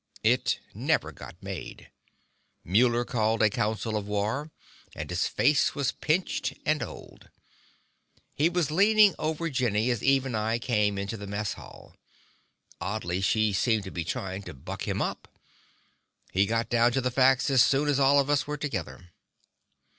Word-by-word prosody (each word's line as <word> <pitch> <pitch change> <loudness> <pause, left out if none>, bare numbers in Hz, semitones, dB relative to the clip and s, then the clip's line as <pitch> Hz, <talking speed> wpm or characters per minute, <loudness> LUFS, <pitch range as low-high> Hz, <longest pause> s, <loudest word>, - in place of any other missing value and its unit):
It - - +2
never - - 0
got - - -11
made. - - -8 0.7
Muller 120 +5 +2
called 110 -1 +1
a 105 - +4
council 110 0 -1
of 105 -1 -3
war, 105 +9 -2 0.5
and - - -5
his - - 0
face 145 -2 +2
was 140 -3 0
pinched 170 +4 -1
and 155 0 +1
old. - - -9 1.0
He 150 +4 +2
was 175 -4 0
leaning 205 +3 +5
on 160 +1 -2
Jenny 120 -2 +1
as 120 - -2
Eve 135 -1 +3
and 125 -4 -3
I 110 +2 0
came 105 -4 0
into 100 +3 -4
the 100 -1 -8
mess 100 +1 -3
hall; - - -14 0.9
oddly, 95 -3 -2
she 110 +1 +2
seemed 110 +1 +1
to 95 - -8
be 85 - -3
trying 95 +3 -4
to 90 -5 -10
buck 65 - -7
him - - 0
up. - - -5 1.0
He 100 +2 +2
got 115 +1 0
down 120 0 +3
to 135 - +1
the 125 0 -1
facts 130 +2 +3
as 130 -3 +5
soon 140 +2 +2
as 145 -1 +2
all 140 +1 +5
of 140 - +1
us 145 0 +1
were 150 0 -3
together. 95 - -5
120 Hz, 165 wpm, -27 LUFS, 105-140 Hz, 1.0 s, leaning